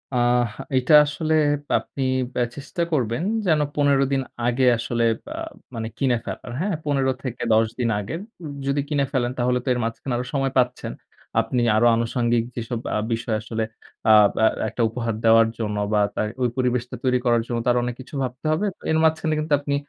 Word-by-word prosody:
আহ 120 Hz, 0 st, +3 dB, 0.3 s
এটা 130 Hz, +4 st, +2 dB
আসলে 155 Hz, +2 st, -2 dB, 0.3 s
প্যাপ -, -, +1 dB
আপনি 135 Hz, -, -3 dB, 0.5 s
চেষ্টা 145 Hz, +5 st, -5 dB
করবেন 125 Hz, -1 st, 0 dB, 0.2 s
যেন 155 Hz, -4 st, +3 dB, 0.2 s
১৫ 140 Hz, -2 st, +3 dB
দিন 135 Hz, -1 st, +2 dB, 0.3 s
আগে 125 Hz, +2 st, +2 dB
আসলে 115 Hz, 0 st, -1 dB, 0.2 s
প্যা 300 Hz, -, -7 dB, 0.4 s
মানে 110 Hz, -1 st, -3 dB
কিনে 130 Hz, -4 st, +2 dB
ফেলার, -, -, -6 dB
হ্যাঁ? 195 Hz, 0 st, 0 dB
১৫-১০ 130 Hz, -5 st, +1 dB
দিন 120 Hz, -, +1 dB
আগে 105 Hz, +10 st, -5 dB, 0.5 s
যদি 140 Hz, +1 st, +1 dB
কিনে 145 Hz, -2 st, +1 dB
ফেলেন 125 Hz, -3 st, 0 dB
তাহলে 125 Hz, 0 st, +1 dB
তো -, -, -16 dB
এর 125 Hz, -, -2 dB
মাঝখানে 115 Hz, +3 st, -3 dB
আরও 125 Hz, -, -3 dB
সময় 135 Hz, -1 st, 0 dB
পাচ্ছেন। 125 Hz, 0 st, +1 dB, 0.5 s
আপনি 125 Hz, -2 st, 0 dB
আরও 120 Hz, +2 st, +4 dB
আনুষাঙ্গিক 115 Hz, 0 st, +1 dB
যেসব 115 Hz, 0 st, -3 dB, 0.2 s
আ -, -, +2 dB, 0.2 s
বিষয় 115 Hz, -1 st, -1 dB
আসলে 110 Hz, 0 st, -3 dB, 0.5 s
আব 105 Hz, -1 st, +7 dB
এ -, -, +7 dB, 0.2 s
একটা 120 Hz, -, -4 dB
উপহার 115 Hz, 0 st, -3 dB
দেওয়ার 115 Hz, 0 st, +6 dB
জন্য 105 Hz, -2 st, -2 dB, 0.2 s
বা 105 Hz, -, +4 dB, 0.2 s
তার 105 Hz, -, 0 dB
ওই 125 Hz, -, +3 dB
পরিবেশটা 125 Hz, -1 st, 0 dB
তৈরি 125 Hz, -1 st, +3 dB
করার 120 Hz, -1 st, +3 dB
জন্য 120 Hz, -, -2 dB
তো -, -, -3 dB
আরো 120 Hz, -, +2 dB
অনেক 120 Hz, -1 st, -3 dB
কিছু 140 Hz, +4 st, -11 dB
ভাবতে 125 Hz, +4 st, -6 dB
হবে। 160 Hz, +7 st, +1 dB, 0.3 s
এর 160 Hz, -, +3 dB
মাঝখানে 160 Hz, 0 st, +2 dB
কিন্তু 155 Hz, 0 st, -1 dB
আপনি 140 Hz, 0 st, -1 dB
125 Hz, 180 wpm, -23 LUFS, 115-140 Hz, 0.5 s, আব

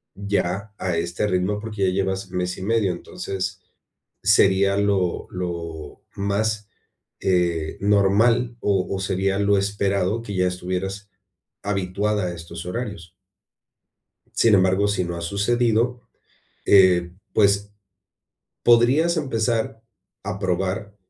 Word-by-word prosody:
ya 100 Hz, 0 st, -2 dB
a 90 Hz, -2 st, -1 dB
este 85 Hz, +4 st, -1 dB
ritmo, 95 Hz, +2 st, 0 dB
porque 105 Hz, -4 st, -1 dB
ya 90 Hz, -, +1 dB
llevas 95 Hz, 0 st, -2 dB
mes 90 Hz, 0 st, -2 dB
y -, -, -8 dB
medio, 105 Hz, -2 st, +1 dB
entonces 95 Hz, +2 st, -5 dB, 0.6 s
sería 100 Hz, -1 st, +4 dB
lo 100 Hz, -3 st, 0 dB
lo 85 Hz, -4 st, -6 dB
más, 105 Hz, +1 st, -1 dB, 0.5 s
eh, 85 Hz, -4 st, 0 dB
normal 105 Hz, +4 st, +3 dB
o 95 Hz, -4 st, +1 dB
o 95 Hz, -, -3 dB
sería 95 Hz, +1 st, 0 dB
lo 100 Hz, 0 st, +3 dB
esperado 100 Hz, +1 st, 0 dB
que 100 Hz, -4 st, -6 dB
ya 90 Hz, 0 st, +2 dB
estuvieras 95 Hz, +3 st, -4 dB, 0.5 s
habituada 100 Hz, +1 st, -1 dB
a 90 Hz, -, -4 dB
estos 85 Hz, +1 st, -8 dB
horarios. 100 Hz, -4 st, -5 dB, 1.3 s
Sin 115 Hz, -, +5 dB
embargo, 95 Hz, +2 st, +3 dB
si 100 Hz, -2 st, 0 dB
no 85 Hz, 0 st, -4 dB
ha 85 Hz, -, -6 dB
sucedido, 115 Hz, +6 st, +1 dB, 0.7 s
eh, 90 Hz, -3 st, +5 dB, 0.2 s
pues, 100 Hz, 0 st, +2 dB, 0.9 s
podrías 130 Hz, +9 st, +4 dB
empezar 115 Hz, -5 st, -1 dB, 0.4 s
a 100 Hz, 0 st, -4 dB
probar 95 Hz, +2 st, -2 dB
100 Hz, 115 wpm, -23 LUFS, 90-105 Hz, 1.3 s, Sin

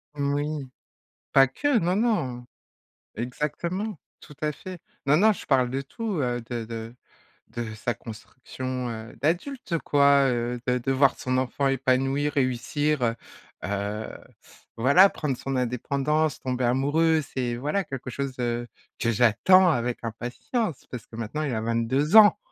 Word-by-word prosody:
Oui, 145 Hz, 0 st, -2 dB, 0.7 s
pas 135 Hz, 0 st, +7 dB
que, 270 Hz, -, +1 dB
non, 180 Hz, -3 st, +1 dB
non, 170 Hz, -, 0 dB, 0.7 s
exactement, 155 Hz, -, -3 dB, 0.2 s
tout 150 Hz, -, -14 dB
à 150 Hz, 0 st, 0 dB
fait. 185 Hz, +4 st, -9 dB, 0.3 s
Non, 145 Hz, +2 st, +5 dB
non, 215 Hz, +4 st, +5 dB
je 200 Hz, -, -8 dB
parle 130 Hz, -3 st, +3 dB
de 135 Hz, +2 st, -2 dB
tout, 200 Hz, +5 st, -4 dB
heu, 120 Hz, -2 st, -1 dB
de 120 Hz, -2 st, -3 dB
de 115 Hz, +1 st, -7 dB, 0.5 s
de 115 Hz, -2 st, -5 dB
sa 110 Hz, +3 st, -2 dB
construction, 125 Hz, +3 st, -6 dB
heu, 110 Hz, 0 st, -7 dB
d'adulte, 175 Hz, -, -1 dB
quoi, 140 Hz, -1 st, +4 dB
heu, 120 Hz, 0 st, -2 dB
de 125 Hz, 0 st, +2 dB
de 135 Hz, +2 st, -1 dB
voir 135 Hz, 0 st, +3 dB
son 130 Hz, 0 st, -1 dB
enfant 130 Hz, +2 st, 0 dB
épanoui, 135 Hz, +2 st, +1 dB
réussir, 145 Hz, +2 st, 0 dB
heu 115 Hz, -1 st, +2 dB, 0.5 s
heu, 100 Hz, +3 st, -3 dB, 0.6 s
voilà, 140 Hz, +12 st, +6 dB
prendre 140 Hz, -4 st, -3 dB
son 135 Hz, +2 st, -4 dB
indépendance, 140 Hz, +5 st, 0 dB
tomber 130 Hz, -1 st, -2 dB
amoureux, 145 Hz, +6 st, +2 dB
c'est 125 Hz, -3 st, -3 dB
voilà, 150 Hz, +10 st, -1 dB
quelque 135 Hz, -1 st, -6 dB
chose, 140 Hz, +2 st, -3 dB
heu, 120 Hz, 0 st, -1 dB, 0.3 s
que 115 Hz, -, +1 dB
j'attends 120 Hz, -, +5 dB
avec 120 Hz, -3 st, -1 dB
impatience, 125 Hz, -, -3 dB
parce 125 Hz, -3 st, -7 dB
que 110 Hz, -, -12 dB
maintenant, 115 Hz, +7 st, -4 dB
il 145 Hz, -4 st, -1 dB
a 110 Hz, -, -1 dB
22 115 Hz, -, +1 dB
ans! 205 Hz, -1 st, +8 dB
135 Hz, 150 wpm, -26 LUFS, 120-150 Hz, 0.7 s, ans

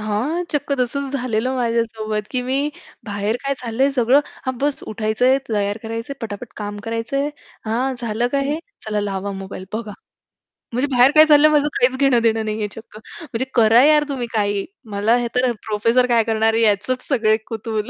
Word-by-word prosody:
हां, 235 Hz, +12 st, -1 dB
चक्क 285 Hz, -1 st, -1 dB
तसंच 275 Hz, +3 st, -2 dB
झालेलं 255 Hz, -1 st, -1 dB
माझ्यासोबत, 225 Hz, -3 st, -1 dB
की 250 Hz, -1 st, -1 dB
मी 260 Hz, +2 st, -1 dB, 0.5 s
बाहेर 205 Hz, +1 st, -2 dB
काय 275 Hz, 0 st, 0 dB
चाललंय, 250 Hz, +3 st, +1 dB
सगळं. 260 Hz, +1 st, +4 dB, 0.3 s
हां, 260 Hz, -1 st, -1 dB
बस 285 Hz, +1 st, 0 dB
उठायचंय, 220 Hz, +5 st, +2 dB
तयार 205 Hz, -1 st, -1 dB
करायचंय, 230 Hz, +4 st, -5 dB
पटापट 220 Hz, +1 st, -6 dB
काम 205 Hz, -1 st, -5 dB
करायचंय. 230 Hz, +6 st, -2 dB, 0.4 s
"हां, 245 Hz, +4 st, -1 dB
झालं. 235 Hz, 0 st, -1 dB
काय 280 Hz, -1 st, +1 dB
हे? 300 Hz, +2 st, -1 dB, 0.3 s
चला, 210 Hz, -1 st, -1 dB
लावा 200 Hz, -1 st, -3 dB
मोबाईल, 190 Hz, -1 st, -7 dB
बघा." 215 Hz, -1 st, -4 dB, 0.8 s
म्हणजे 255 Hz, +4 st, +1 dB
बाहेर 250 Hz, +2 st, +6 dB
काय 310 Hz, -, +9 dB
चाललंय, 305 Hz, 0 st, +6 dB
माझं 295 Hz, -1 st, +3 dB
काहीच 255 Hz, +1 st, +3 dB
घेणं-देणं 230 Hz, -5 st, +3 dB
नाहीये, 215 Hz, 0 st, -2 dB
चक्क. 220 Hz, -1 st, -12 dB, 0.2 s
म्हणजे 260 Hz, -5 st, -3 dB
करा 230 Hz, +1 st, +6 dB
यार 300 Hz, 0 st, +5 dB
तुम्ही 250 Hz, -4 st, -3 dB
काहीही. 205 Hz, -2 st, 0 dB, 0.3 s
मला 215 Hz, +4 st, +3 dB
हे 240 Hz, -1 st, -1 dB
तर 250 Hz, 0 st, +2 dB
प्रोफेसर 230 Hz, +4 st, +2 dB
काय 230 Hz, -1 st, +4 dB
करणार 220 Hz, 0 st, +1 dB
आहे, 225 Hz, -, +1 dB
याचंच 225 Hz, +5 st, +1 dB
सगळे 220 Hz, -5 st, +2 dB
कुतूहल. 220 Hz, -1 st, -4 dB
230 Hz, 170 wpm, -20 LUFS, 215-260 Hz, 0.8 s, काय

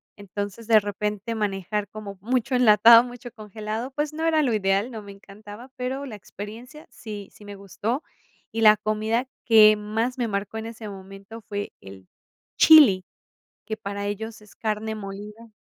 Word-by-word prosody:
Entonces, 205 Hz, +2 st, -7 dB
de 225 Hz, -2 st, +6 dB
repente 210 Hz, +2 st, -4 dB
manejar 205 Hz, -1 st, -2 dB
como 205 Hz, -2 st, -9 dB
mucho 250 Hz, +3 st, 0 dB
enlatado, 230 Hz, -1 st, +7 dB
mucho 245 Hz, 0 st, -9 dB
congelado, 215 Hz, +2 st, -6 dB
pues, 295 Hz, +2 st, -3 dB
no 320 Hz, +1 st, -3 dB
era 320 Hz, -1 st, +3 dB
lo 255 Hz, -6 st, +1 dB
ideal, 200 Hz, +2 st, +1 dB
no 225 Hz, -4 st, -7 dB
me 200 Hz, -1 st, -11 dB
encantaba, 205 Hz, +4 st, -13 dB
pero 260 Hz, +3 st, -4 dB
la 240 Hz, -6 st, -8 dB
experiencia 225 Hz, +9 st, -10 dB
sí 205 Hz, -3 st, -9 dB
sí -, -, -17 dB
me 205 Hz, 0 st, -9 dB
gustó. 205 Hz, -, -4 dB, 0.5 s
Y 225 Hz, -, -2 dB
la 215 Hz, -1 st, +7 dB
comida 215 Hz, +4 st, -1 dB, 0.2 s
que 215 Hz, -2 st, +7 dB
más 220 Hz, +4 st, -2 dB
me 240 Hz, -3 st, -1 dB
marcó 200 Hz, +1 st, -3 dB
en 220 Hz, -, -6 dB
ese 225 Hz, -1 st, -9 dB
momento 195 Hz, +3 st, -10 dB
fue 205 Hz, -1 st, -6 dB
el 95 Hz, -1 st, -13 dB, 0.5 s
chili, 260 Hz, -13 st, +7 dB, 0.6 s
que 220 Hz, -, -4 dB
para 200 Hz, -1 st, -5 dB
ellos 220 Hz, +2 st, -5 dB
es 210 Hz, -1 st, -18 dB
carne 220 Hz, 0 st, -3 dB
molida. 210 Hz, +2 st, -9 dB
215 Hz, 165 wpm, -24 LUFS, 205-230 Hz, 0.6 s, enlatado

